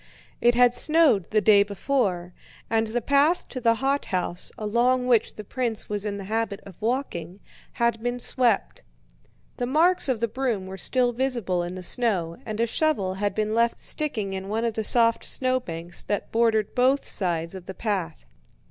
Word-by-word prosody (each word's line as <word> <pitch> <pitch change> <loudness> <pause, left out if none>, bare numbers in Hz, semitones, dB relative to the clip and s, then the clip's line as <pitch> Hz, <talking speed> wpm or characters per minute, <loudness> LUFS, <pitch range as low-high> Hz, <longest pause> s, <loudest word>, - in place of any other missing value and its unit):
It 240 0 +4
had 245 0 +5
snowed 300 - +3
the 215 -1 +2
day 205 -1 +6
before 200 -4 -1 0.4
and 225 0 +2
the 235 +2 -2
path 290 +5 +3
to 255 - -6
the 230 -1 +3
hothouse, 225 -10 -1
along 240 +4 +1
which 240 -3 +2
the 215 - -7
prince 235 0 -3
was 210 0 -2
in 200 -1 -3
the 200 - -6
habit 220 0 -2
of 195 -3 -12
walking, 210 - -3 0.3
had 235 -1 0
been 245 +1 -2
swept: 245 -3 0 0.8
the 245 - -2
marks 325 +4 +3
of 250 -4 0
the 235 - 0
broom 230 -4 -2
were 190 0 -7
still 250 +3 +2
visible 235 -8 -1
in 175 +1 -5
the 185 - -7
snow 180 -7 0
and 215 0 -4
a 230 - +3
shovel 235 -7 0
had 205 +1 -2
been 215 0 -1
left 235 +1 +1
sticking 220 -11 -3
in 190 0 -5
one 225 +2 -1
of 230 - -1
the 220 - -2
soft 230 +1 +3
snowbanks 175 -11 -1
that 205 -1 -3
bordered 225 -2 +1
both 260 +3 +2
sides 170 -3 -3
of 185 -2 -10
the 190 - -7
path. 190 - -3
225 Hz, 180 wpm, -25 LUFS, 195-250 Hz, 0.8 s, day